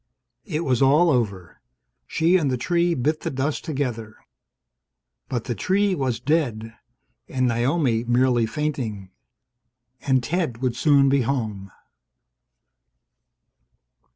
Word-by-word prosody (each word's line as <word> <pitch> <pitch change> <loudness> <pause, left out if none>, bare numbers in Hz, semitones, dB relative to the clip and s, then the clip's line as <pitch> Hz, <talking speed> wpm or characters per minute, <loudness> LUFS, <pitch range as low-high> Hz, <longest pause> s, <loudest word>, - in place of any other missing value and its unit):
It 160 -4 -2
was 130 -2 +1
all 150 +6 +5
over. 100 - -2 0.5
She 170 +3 +2
and 160 -7 +2
the 130 - 0
tree 170 +5 +1
bit 150 +5 0
the - - -3
dust 140 +3 -2
together. 120 -7 -4 1.1
But 120 -3 -2
the 120 - -3
tree 195 - +1
was 130 -8 -1
dead, 120 -6 -1 0.5
and 130 -1 0
Naomi 120 0 +1
merely 120 -1 +2
fainting, 115 -8 -4 0.9
and 130 -2 +1
Ted 160 -3 -2
would 125 -1 -2
soon 140 +1 +4
be 135 0 +3
home 110 -6 -3
130 Hz, 115 wpm, -23 LUFS, 115-150 Hz, 1.1 s, all